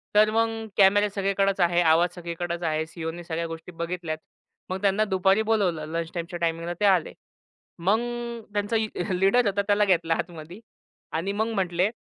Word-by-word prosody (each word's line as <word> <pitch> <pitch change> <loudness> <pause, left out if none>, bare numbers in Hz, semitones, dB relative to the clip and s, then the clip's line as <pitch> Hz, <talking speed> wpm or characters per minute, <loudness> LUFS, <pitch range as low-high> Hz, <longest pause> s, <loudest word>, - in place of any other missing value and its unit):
तर 215 0 +6
मग 225 0 0
कॅमेरा 205 +1 +5
सगळीकडेच 195 0 +1
आहे. 175 0 +3
आवाज 165 +1 +4
सगळीकडेच 170 0 -4
आहे. 155 -1 0
सी-ई-ओने 165 +1 -6
सगळ्या 165 0 -3
गोष्टी 165 +2 -8
बघितल्यात. 170 -1 -4 0.5
मग 185 +1 -3
त्यांना 200 +1 +3
दुपारी 190 +3 +3
बोलावलं 175 -8 +1
लंच 165 -1 -3
टाईमच्या 170 0 -5
टायमिंगला 165 +1 -1
ते 205 - +2
आले. 185 -5 +3 0.7
मग 200 +6 +2 0.5
त्यांचा 205 +2 -1
ए 220 -1 +1 0.3
लीडर 215 +5 +4
होता 200 0 +1
त्याला 205 0 +4
घेतला 165 -3 +2
आतमध्ये 170 +3 -6 0.5
आणि 170 +5 -1
मग 220 +2 -1
म्हटले 185 0 +1
180 Hz, 160 wpm, -26 LUFS, 170-205 Hz, 0.7 s, तर